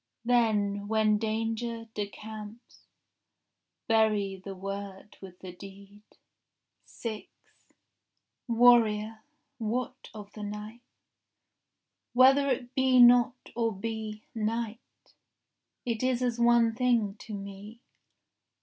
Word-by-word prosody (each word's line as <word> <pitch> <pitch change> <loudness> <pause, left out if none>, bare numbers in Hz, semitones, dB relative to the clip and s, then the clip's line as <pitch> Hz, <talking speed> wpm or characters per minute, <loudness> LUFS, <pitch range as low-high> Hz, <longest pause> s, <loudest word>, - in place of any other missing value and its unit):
Then, 210 -4 +1
when 215 -1 +2
danger 225 +1 -2
decamps, 210 +2 -8 1.0
Bury 215 -4 +2
the 195 0 -7
word 195 +1 -7
with 185 -2 -11
the 185 - -8
deed. 200 +2 -13 0.8
6 220 -3 -7 1.2
Warrior, 225 -2 +4 0.4
what 245 +3 -3
of 210 -2 -11
the 215 - -9
night?— 210 +3 -7 1.3
Whether 270 +3 +6
it 245 -1 -2
be 260 -1 +3
not 245 0 +5
or 230 -1 +1
be 215 +1 -5
Night, 225 0 -2 1.1
is 245 +1 0
as 240 -1 -1
one 235 -1 +4
thing 235 -4 +1
to 215 - -7
me. 200 +3 -9
220 Hz, 95 wpm, -29 LUFS, 205-235 Hz, 1.3 s, Whether